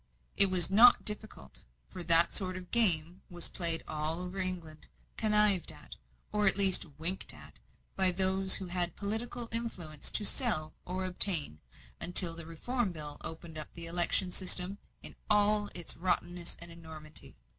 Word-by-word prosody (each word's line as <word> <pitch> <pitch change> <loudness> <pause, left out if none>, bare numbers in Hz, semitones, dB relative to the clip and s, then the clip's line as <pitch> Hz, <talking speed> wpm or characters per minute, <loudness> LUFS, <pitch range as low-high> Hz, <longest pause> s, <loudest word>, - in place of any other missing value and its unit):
It 200 - +7
was 185 -1 +2
not 235 +5 +5
difficult, 210 -1 -3 0.3
for 180 - -8
that 165 +1 +6
sort 185 -2 +1
of 180 -1 -12
game 180 -6 +2
was 175 -2 -3
played 170 -2 +3
all 155 +2 -3
over 180 +2 -8
England, 175 -4 -5 0.3
connived 210 -5 0
at, - - -14 0.4
or 210 -1 -1
at 195 - +8
least 195 -3 +2
winked 180 +4 0
at, - - -15 0.4
by 190 -1 +3
those 190 +1 +4
who 190 - -4
had 175 -1 -3
political 230 +3 -6
influence 180 -10 -2
to 210 - -3
sell 195 - -1
or 185 +1 -5
obtain, 180 - +3 0.4
until 175 -1 +2
the 165 -1 -10
Reform 225 +6 -4
Bill 150 -3 -8
opened 160 -1 -8
up 155 - -7
the 170 - -6
election 175 +2 0
system 185 +1 -1 0.2
in - - -6
all 210 0 +1
its 175 -2 -6
rottenness 175 0 -4
and 170 0 -10
enormity. 160 - -8
180 Hz, 155 wpm, -29 LUFS, 165-200 Hz, 0.4 s, at